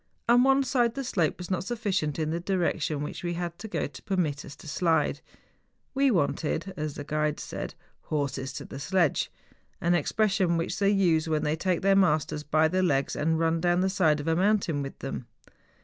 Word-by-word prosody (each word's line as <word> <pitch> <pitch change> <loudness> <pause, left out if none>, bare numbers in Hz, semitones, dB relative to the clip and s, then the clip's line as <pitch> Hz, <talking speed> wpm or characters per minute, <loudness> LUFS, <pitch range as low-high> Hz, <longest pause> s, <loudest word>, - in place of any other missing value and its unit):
On 240 +1 +6
one 270 +1 +4
side 240 -3 +1
the 275 - -3
slope 175 - 0
was 180 +1 -7
not 185 -1 0
sufficient 200 - -1
in 155 -1 -1
the 170 - -1
direction 170 -5 -1
which 150 - -6
we 175 -1 -2
had 170 -1 -4
to 220 - -6
go - - -2
to - - -9
permit 160 -7 -1
us 140 - -10
to - - -13
slide. 165 +2 +1 0.7
'We 275 0 +3
wanted,' 170 - 0
as 150 -3 -4
the 145 - -5
guides 150 0 -1
said, - - -6 0.3
'horses 140 -3 -2
to - - -6
the - - -8
sledge;' 170 +1 +1 0.5
an 170 +1 +2
expression 190 +1 +2
which 165 +2 -2
they 200 -1 +3
use 170 -6 +2
when 155 -1 +1
they 150 - +1
take 180 +1 -1
their 195 0 +5
masters 155 -5 +2
by 155 +1 +2
the 185 +4 +1
legs 140 -7 +1
and 160 +2 +1
run 165 0 +1
down 175 +1 +2
the 190 0 +1
side 160 -6 +3
of 145 - -5
a 165 - +2
mountain 190 -5 +2
with 135 -1 -6
them. 135 -3 -6
170 Hz, 205 wpm, -27 LUFS, 150-190 Hz, 0.7 s, On